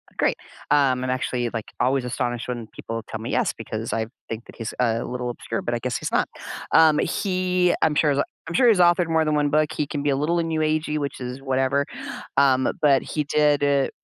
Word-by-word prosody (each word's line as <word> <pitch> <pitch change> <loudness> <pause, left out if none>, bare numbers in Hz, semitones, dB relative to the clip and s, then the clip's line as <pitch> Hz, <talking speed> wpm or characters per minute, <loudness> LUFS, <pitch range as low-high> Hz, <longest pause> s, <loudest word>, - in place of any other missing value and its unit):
Great. - - +1 0.3
Um, 135 -3 +3
I'm 130 - -2
actually, 125 -1 -1
like, 115 -2 -3 0.2
always 130 0 +2
astonished 120 -1 -2
when 120 -3 -4
people 115 +1 -6
tell - - -5
me - - -5
yes - - +1
because - - -5
I 110 -1 -1 0.2
think 115 +1 -5
that - - -14
he's 115 -2 -5
a 115 -2 +1
little 125 0 -4
obscure, 115 -1 -4
but 120 - -3
I 120 - 0
guess 125 +1 -2
he's - - -4
not, - - +1 0.4
um, 155 -2 +6
he 185 -2 +1
I'm 160 - +3
sure 150 0 +3
he's 140 - 0
a - - +3 0.2
I'm 165 - -5
sure 245 +6 +5
he's 210 - +4
authored 175 -1 +4
more 160 -1 +2
than 155 -1 +1
1 145 -1 +2
book. 150 0 +2
He 150 - -1
can 145 0 -4
be 145 - +1
a 140 - +2
little 155 +5 +1
new 165 -1 -1
agey, 155 0 0
which 140 -2 -3
is 125 +1 -6
whatever, 135 +1 +1 0.5
um, 130 -2 +4
but 140 -4 +5
he 150 -1 -3
did, 150 0 +2
uh, 140 -1 +2
140 Hz, 230 wpm, -23 LUFS, 125-155 Hz, 0.5 s, um